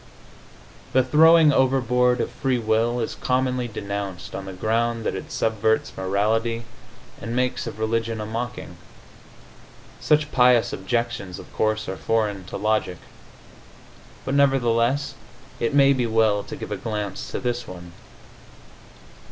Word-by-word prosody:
The 130 - +4
throwing 160 +3 +6
overboard 125 -2 +2
of - - -3
free 130 -2 -1
will 115 +1 +1
is 115 - -2
commonly 125 -1 0
denounced 100 -4 -5
on 95 - -5
the 95 - -6
ground 115 +4 0
that - - 0
it - - -7
subverts 110 0 0
morality 110 +5 0 0.6
and 115 +1 -4
makes 125 -1 -1
of 110 - -6
religion 115 0 -1
a 105 - -4
mocking. 120 +3 -5 1.2
Such 150 0 +2
pious 125 -2 +4
objections, 115 -3 -2
of - - -13
course, 110 0 0
are 95 - -4
foreign 105 0 -1
to - - -6
logic, 105 -4 0 1.3
but 135 - -2
nevertheless 135 0 +2 0.5
it 120 +5 -1
may 140 -1 +6
be 125 -3 0
well 110 -2 +2
to - - -7
give - - -8
a 105 - -2
glance 105 -1 -4
to - - -4
this 120 -1 -3
one. 90 -1 -10
115 Hz, 135 wpm, -23 LUFS, 110-125 Hz, 1.3 s, throwing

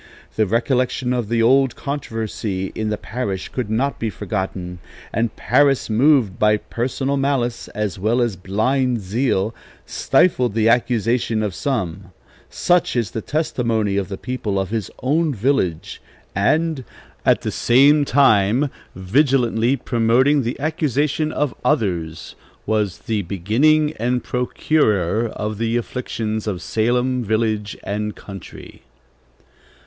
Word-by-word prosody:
The 110 -1 +2
recollection 125 +3 0
of 120 -4 -2
the 115 -1 +2
old 130 +1 +4
controversy 110 -8 -4
in 110 -1 -2
the 105 - -1
parish 100 -6 -4
could 125 -5 -4
not 130 +6 -1
be 115 - -1
forgotten; 95 -1 -4 0.3
and 115 0 -1
Parris, 135 -2 +2
moved 120 -4 +3
by 105 0 +4
personal 130 +5 -2
malice 135 -4 -1
as 105 -4 -2
well 110 +5 +1
as 120 -5 +1
blind 120 +7 0
zeal, 105 +1 0 0.3
'stifled 125 - +2
the 110 -1 +3
accusation 115 -1 +1
of 105 -3 -2
some,' 100 -8 -2 0.4
such 175 -5 +1
is 115 -7 0
the 110 - -4
testimony 115 -9 -1
of 100 -2 -1
the 95 - -5
people 115 -5 -3
of 95 +1 -3
his 110 -4 -2
own 150 +2 +1
village, 105 - -1 0.3
and, 155 - +1 0.4
at - - +3
the - - -3
same 140 +5 +4
time, 130 -1 +3 0.2
'vigilantly 120 +4 +2
promoting 125 +3 +2
the 120 +2 -3
accusation 150 0 0
of 150 -3 -1
others,' 85 - -1 0.3
was 105 -4 0
'the 110 -2 -2
beginning 125 - +2
and 125 +2 0
procurer 115 - +1
of 105 -1 -5
the 115 +1 0
afflictions 110 -3 -3
of 95 -4 -2
Salem 125 +3 0
village 110 -1 -1
and 105 +1 -3
country.' 100 -4 -11
115 Hz, 130 wpm, -20 LUFS, 105-130 Hz, 0.4 s, old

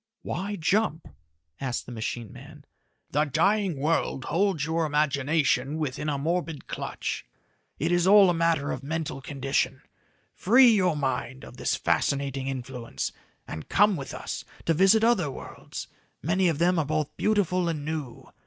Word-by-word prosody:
"Why 200 +3 -3
jump?" 185 -1 0 0.5
asked 130 -2 -3
the - - -9
machine 115 -1 -4
man. - - -13 0.5
"The 150 +2 +2
dying 180 +4 +1
world 140 -2 0
holds 185 -5 +1
your 165 +1 0
imagination 145 -1 +1
within 150 0 -2
a 145 - 0
morbid 165 +1 -2
clutch. - - -4 0.5
It 165 +4 0
is 175 0 +3
all 200 0 +8
a - - 0
matter 165 -4 +1
of 130 - -4
mental 150 -1 -4
condition. 135 -1 -1 0.5
Free 245 +5 +6
your 185 -7 +2
mind 135 -1 -2
of - - -13
this - - 0
fascinating 135 -1 0
influence 125 -3 -4 0.4
and 80 - -7
come 205 0 +4
with 140 -5 -6
us - - -5 0.2
to 165 - +3
visit 195 +6 +5
other 220 -10 +3
worlds, 135 - -8 0.4
many 180 +5 +2
of 165 -4 +1
them 175 +2 +3
are 155 - +1
both 155 0 -2
beautiful 185 -4 +1
and 150 -3 -3
new. 150 -6 -5
155 Hz, 155 wpm, -27 LUFS, 135-180 Hz, 0.5 s, all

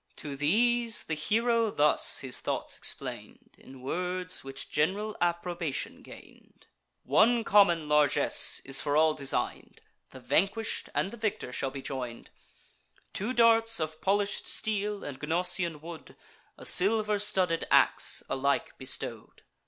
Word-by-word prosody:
To 145 -2 -7
these 230 - +2
the 160 - -4
hero 230 +8 +1
thus 150 -6 +3
his 130 -2 +1
thoughts - - -3
explain'd, - - -6
In 130 -1 -14
words 180 +5 -3
which 135 0 -8
gen'ral 200 +8 -1
approbation 170 -3 -2
gain'd: - - -16 0.4
"One 225 - +3
common 175 -7 +4
largess 150 -1 +3
is 135 0 +1
for 145 0 0
all 155 0 +4
design'd, 140 -3 -3 0.3
The - - -12
vanquish'd 200 +5 -1
and 195 - 0
the 235 - -10
victor 215 - -3
shall 135 - -2
be 135 0 -8
join'd, 125 -4 -6 0.8
Two 210 +6 -2
darts 230 -2 +3
of 155 0 -5
polish'd 200 +1 0
steel 210 -1 -2
and 135 -2 -7
Gnosian 170 0 0
wood, 165 0 -11 0.4
A - - -12
silver 210 +2 +3
studded 185 -5 0
ax - - +3
alike 140 +1 -1
bestow'd. 130 - -6
175 Hz, 130 wpm, -29 LUFS, 150-210 Hz, 0.8 s, common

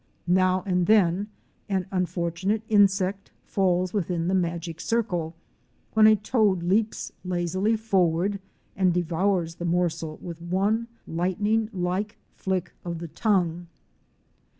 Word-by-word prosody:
Now 185 +1 +3
and 180 -2 +1
then 200 -2 +3 0.4
an 190 -2 0
unfor 175 -2 -1
tunate 195 +6 -1
insect 195 -2 +2 0.2
falls 185 -2 +1
within 175 -4 -1
the - - +1
magic 170 -2 -1
circle, 175 -8 -1 0.6
when 220 0 +7
a 215 - +7
toad 210 -4 +1
leaps 210 +5 0
lazily 185 +4 0
forward 195 -2 +1 0.4
and 185 -2 +2
devours 175 0 0
the 175 - -4
morsel 165 -2 -1
with 170 -1 -8
one 200 +6 0 0.2
lightning 205 +6 0
like 190 +3 -2 0.2
flick 185 -2 -2
of 170 -1 -4
the 170 0 -7
tongue. 175 -4 0
185 Hz, 125 wpm, -26 LUFS, 175-205 Hz, 0.6 s, when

